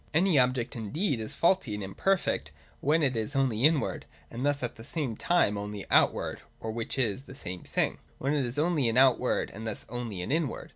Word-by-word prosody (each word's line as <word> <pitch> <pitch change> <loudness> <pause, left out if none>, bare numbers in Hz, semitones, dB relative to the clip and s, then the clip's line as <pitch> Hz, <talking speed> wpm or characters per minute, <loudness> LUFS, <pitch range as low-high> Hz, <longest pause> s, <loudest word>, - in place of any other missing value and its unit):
Any 170 -3 +4
object 125 0 +1
indeed 130 - -1
is 110 - -3
faulty 170 - +2
and 105 - -4
imperfect 185 - 0 0.3
when 155 +3 +2
it 130 -3 +2
is 110 +5 -2
only 130 -4 +1
inward, 155 -2 +1 0.2
and 120 +2 -5
thus 145 -1 +1
at 120 - -3
the 110 - -11
same 135 -3 -2
time 105 -13 +2
only 105 -1 -5
outward, - - +3 0.2
or, 110 - -4
(which 115 +3 -3
is 125 0 0
the 135 - -11
same 90 -9 -5
thing,) - - -1 0.2
when 140 +3 -1
it 145 -2 +1
is 120 +2 -4
only 150 -5 +2
an 115 - 0
outward 130 -1 +3
and 110 +2 -6
thus 110 - -3
only 115 -6 -4
an 90 - -3
inward. 155 -4 -1
125 Hz, 205 wpm, -29 LUFS, 110-145 Hz, 0.3 s, Any